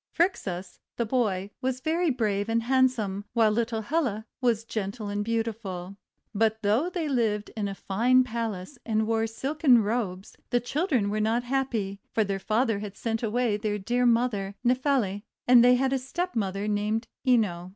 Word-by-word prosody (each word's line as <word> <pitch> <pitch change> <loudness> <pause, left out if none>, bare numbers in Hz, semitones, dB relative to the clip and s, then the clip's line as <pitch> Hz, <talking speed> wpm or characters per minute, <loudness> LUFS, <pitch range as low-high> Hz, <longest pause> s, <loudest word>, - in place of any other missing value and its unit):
Phrixus, 195 - -1 0.2
the 235 - 0
boy, 210 -5 0
was 260 -1 -1
very 330 +4 +1
brave 215 -5 0
and 230 0 +1
handsome, 245 -6 +1
while 225 -2 +4
little 225 0 -1
Helle 245 -6 -1 0.2
was 235 -3 +2
gentle 210 -1 -4
and 205 0 -1
beautiful. 215 -5 -3 0.4
But 220 +1 +1
though 225 - +2
they 345 -4 -2
lived 220 -6 0
in 210 -2 -1
a 195 - -5
fine 245 +7 +3
palace 230 -1 -4
and 220 -1 0
wore 225 0 +1
silken 265 +1 +3
robes, 205 -4 -3
the 245 - +2
children 250 - 0
were 215 - -1
not 225 +3 +1
happy; 240 -7 -2
for 220 - +4
their 195 -1 -2
father 220 +1 +1
had 205 -1 -7
sent 225 -1 -2
away 230 -1 +1
their 210 -1 -2
dear 245 +5 +1
mother 230 -5 +1
Nephele, 250 -6 +1 0.3
and 245 -1 +8
they 250 0 +6
had 265 +1 +1
a 270 - +1
stepmother 230 - -2
named 210 +2 -1 0.2
Ino. 190 -8 +2
225 Hz, 165 wpm, -27 LUFS, 205-250 Hz, 0.4 s, and